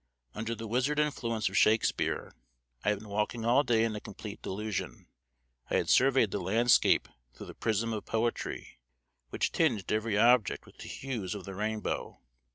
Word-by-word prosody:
Under 115 +2 -3
the 115 +1 -7
wizard 130 +6 0
influence 115 -8 0
of 95 - -4
Shakespeare 110 +2 +2 0.5
I - - +2
had 105 - +1
been 105 +1 -12
walking 105 +3 -1
all 120 +4 +5
day 115 -5 +2
in 115 -1 -1
a - - -3
complete 105 0 -9
delusion. 105 +1 -4 0.6
I - - 0
had - - +1
surveyed 130 -5 +4
the 100 - -2
landscape 115 +7 +3 0.3
through - - -9
the - - -9
prism 115 +1 -1
of 105 - -5
poetry, 115 - -2 0.5
which - - -1
tinged 115 - +1
every 110 0 0
object 120 -1 +4
with - - -18
the - - -8
hues 115 -9 -4
of 100 - -7
the 95 - -7
rainbow. 105 +2 -3
110 Hz, 170 wpm, -30 LUFS, 105-120 Hz, 0.6 s, all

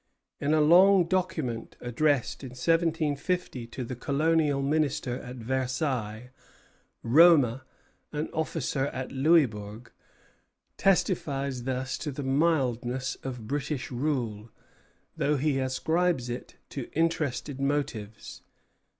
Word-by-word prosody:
In 145 - 0
a 155 - +4
long 180 +5 +6
document 165 -10 -2
addressed 135 +2 0
in 130 -3 -8
1750 160 -1 0
to 125 +2 -6
the 125 +1 -5
Colonial 145 +2 +1
Minister 140 -4 0
at 125 +1 -8
Versailles, 125 -2 -2 0.7
Roma, 135 -2 +5 0.5
an 150 +1 -2
officer 155 -3 -1
at 130 -2 -5
Louisbourg, 125 -7 +1 0.8
testifies 140 -9 0
thus 130 0 -2
to 150 - -3
the 140 +1 -5
mildness 130 -4 0
of 125 -5 -6
British 140 -1 -3
rule, 120 -5 -2 0.7
though 145 +1 +1
he 140 0 +1
ascribes 130 +1 0
it 120 - -7 0.2
to 135 -4 -5
interested 150 -4 -1
motives. 140 -7 -3
135 Hz, 105 wpm, -28 LUFS, 125-155 Hz, 0.8 s, long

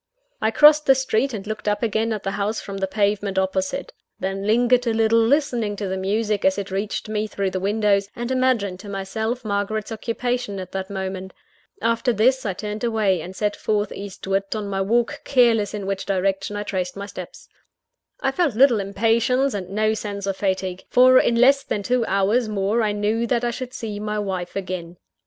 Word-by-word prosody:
I 220 - +3
crossed 300 +5 +6
the 270 - +7
street, 265 0 0
and 210 -4 -6
looked 215 0 -5
up 205 +1 0
again 225 0 0
at 215 -2 -3
the 195 - -2
house 205 +2 -1
from 200 -1 -7
the 195 0 -1
pavement 200 -1 0
opposite. 190 0 -1 0.3
Then 195 +1 -3
lingered 245 +2 +3
a 225 - +1
little, 225 0 +3
listening 235 -4 +1
to 200 -1 -4
the 190 - -2
music 205 +2 -1
as 190 0 +3
it 200 -1 -4
reached 200 +3 -3
me 215 0 -1
through 200 -2 -2
the 185 - -2
windows, 200 0 +1
and 240 +1 -4
imagining 250 -8 +1
to 205 - -9
myself 220 +5 -3
Margaret's 205 +1 -2
occupation 230 -1 -2
at 185 -1 -7
that 190 0 -4
moment. 190 -1 -5 0.5
After 230 +2 +2
this, 250 +3 +2
I 195 - -1
turned 210 +4 -5
away; 215 -6 +1
and 185 +4 -8
set 210 0 -1
forth 210 -1 -1
eastward 195 0 -3
on 210 -2 -3
my 195 -1 -2
walk, 230 +4 0
careless 235 -6 +3
in 205 -2 -5
which 195 0 -3
direction 195 +1 0
I 205 - -2
traced 185 -3 -3
my 200 - -5
steps. 185 -3 -9 0.7
I 270 - +1
felt 295 -5 0
little 245 -2 +5
impatience, 230 +6 +1
and 190 -3 -4
no 215 +2 +1
sense 205 -2 -4
of 195 -1 -1
fatigue; 190 -2 -2
for 255 +1 +7
in 235 - +2
less 270 +4 +5
than 205 -6 -3
two 245 +1 +1
hours 205 +5 +2
more 210 +2 0
I 215 -2 +1
knew 210 +3 0
that 240 0 0
I 240 - +1
should 255 +2 -6
see 215 -4 -5
my 210 0 -3
wife 190 -4 -3
again. 180 -3 -5
210 Hz, 200 wpm, -22 LUFS, 195-230 Hz, 0.7 s, the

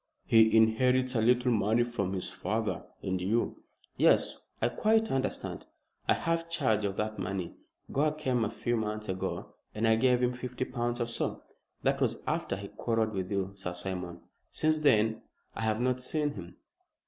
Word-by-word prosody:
He 110 0 +6
inherits 125 +3 +3
a 115 - +2
little 125 +2 +3
money 110 +1 +3
from 100 -6 -2
his 90 -1 -2
father; 105 +4 -2 0.2
and 95 -1 -1
you 110 +6 0 0.2
" - - -27
"Yes! - - +4 0.2
I - - +2
quite 220 0 +2
understand. 135 0 -2 0.4
I - - +5
have 165 0 -1
charge 125 -11 +1
of 100 -1 -1
that 110 0 -2
money. 95 -1 -3 0.4
Gore 150 +3 +2
came 130 -6 0
a 105 - 0
few 120 +1 -1
months 105 -1 -3
ago, 95 0 -3 0.2
and 110 +1 +1
I 110 0 +5
gave 125 +1 +3
him 125 0 +2
fifty 125 0 -4
pounds 120 -1 -2
or 120 - +1
so. 115 - -2 0.4
That - - +1
was - - +1
after - - -1
he 100 +1 -7
quarrelled 115 -2 -1
with 95 -1 -3
you, 100 -1 -1
Sir 95 -2 -5
Simon. 90 -1 -5 0.3
Since 155 0 +1
then 110 -7 +3 0.3
I - - -4
have 110 0 +1
not 125 +1 +1
seen 150 +3 0
him." 90 -9 -9
115 Hz, 180 wpm, -30 LUFS, 100-125 Hz, 0.4 s, He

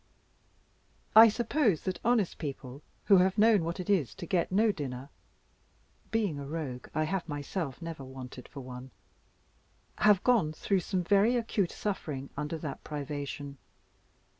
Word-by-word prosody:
I 225 +1 +11
suppose 230 - +1
that 185 -2 -3
honest 230 -5 +1
people, 140 -3 -6 0.2
who 200 - +7
have 185 +3 +3
known 215 -3 +5
what 170 +2 -3
it 180 - -5
is 165 - +1
to - - -7
get 175 +1 0
no 215 +3 +4
dinner 135 -5 -6 1.0
(being 205 -10 0
a 140 - -6
Rogue, 140 -5 -5
I 155 - +2
have 170 +1 -2
myself 145 +1 -4
never 165 -4 -6
wanted 130 -1 -9
for 140 - -9
one), 125 0 -9 1.1
have 210 -3 +5
gone 220 -12 +3
through 195 +4 0
some 180 +1 -2
very 205 +6 +4
acute 220 -6 0
suffering 150 -9 -4
under 150 +3 -3
that 150 -3 -6
privation. 145 -1 -5
165 Hz, 145 wpm, -30 LUFS, 140-200 Hz, 1.1 s, I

